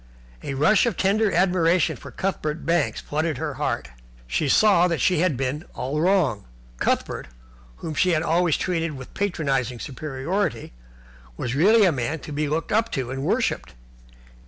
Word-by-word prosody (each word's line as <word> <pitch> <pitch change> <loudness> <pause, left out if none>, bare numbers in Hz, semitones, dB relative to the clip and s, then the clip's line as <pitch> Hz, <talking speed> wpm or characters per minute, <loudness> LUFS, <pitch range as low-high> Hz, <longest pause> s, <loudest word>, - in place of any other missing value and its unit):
A 135 - -4
rush 200 - +4
of 235 - -2
tender 205 +2 +2
admiration 180 -2 +2
for - - -11
Cuthbert 165 -5 -3
Banks 170 -3 +1
flooded 155 +1 -2
her - - -3
heart. 65 - -1 0.4
She 70 - -1
saw 190 0 +5
that 165 -3 -1
she 180 -4 +2
had 170 -6 +1
been 135 +4 -2
all 140 +4 -2
wrong. 170 - +2 0.3
Cuthbert, - - -1 0.5
whom 160 - -6
she 185 - +2
had 160 -2 +2
always 170 -1 +2
treated 165 -3 -1
with 130 -2 -9
a - - -22
patronizing 135 - -1
superiority, 140 - -3 0.6
was 120 - -3
really 205 - +5
a 180 - +4
man 135 +2 -2
to 150 - -9
be 150 0 -1
looked 160 +2 -2
up 225 +2 +1
to 130 -3 -2
and 135 0 -4
worshipped. 225 - -1
160 Hz, 165 wpm, -24 LUFS, 135-185 Hz, 0.6 s, saw